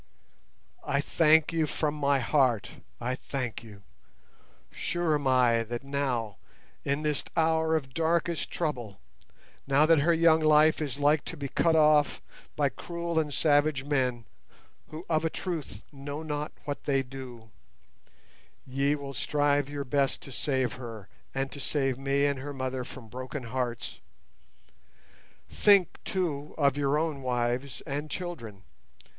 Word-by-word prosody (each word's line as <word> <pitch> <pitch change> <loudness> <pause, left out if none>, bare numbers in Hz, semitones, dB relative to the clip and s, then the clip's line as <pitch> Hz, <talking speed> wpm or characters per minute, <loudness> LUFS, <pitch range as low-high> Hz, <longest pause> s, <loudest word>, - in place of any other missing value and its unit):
"I 140 - 0
thank 160 +2 +4
you 160 -2 +1
from 150 0 -1
my 140 -2 +2
heart—I 125 -2 0
thank 130 -2 -4
you. 105 -3 -13 0.9
Sure 175 -2 -1
am 145 -2 0
I 125 -3 +4
that 120 +3 -5
now, 130 -7 -2 0.5
in 140 +2 -1
this 150 -2 0
hour 160 0 +3
of 135 -4 -3
darkest 165 +2 0
trouble; 120 - -3 0.7
now 140 +2 +5
that 165 -1 +5
her 160 +5 +3
young 165 -1 +5
life 155 0 +5
is 140 -3 -3
like 145 +1 +3
to 165 - -6
be 140 -1 -4
cut 165 +3 +2
off 150 -2 +4 0.4
by 145 -2 +2
cruel 170 +3 -3
and 150 -2 -1
savage 145 -2 +2
men—who 135 +4 -5
of 160 -1 +1
a 165 - +1
truth 155 - -5
'know 145 +2 -6
not 150 -1 -3
what 145 -1 -5
they 135 -2 +2
do'—ye 125 - -7
will 140 -1 -7
strive 145 +3 +1
your 145 -1 -4
best 140 0 +1
to 135 - -10
save 130 -2 -1
her, 115 -5 -8 0.3
and 135 0 -1
to 140 - -8
save 135 -2 -1
me 140 +1 +1
and 140 -2 0
her 145 +2 -6
mother 130 -1 -3
from 125 -1 -10
broken 130 +4 -6
hearts. 120 -1 -3 1.5
Think, 200 -4 +4
too, 150 -6 -2
of 140 -3 +3
your 145 0 +1
own 155 -3 -1
wives 125 +1 -1
and 145 +2 -4
children. 120 - -6
140 Hz, 140 wpm, -28 LUFS, 130-155 Hz, 1.5 s, now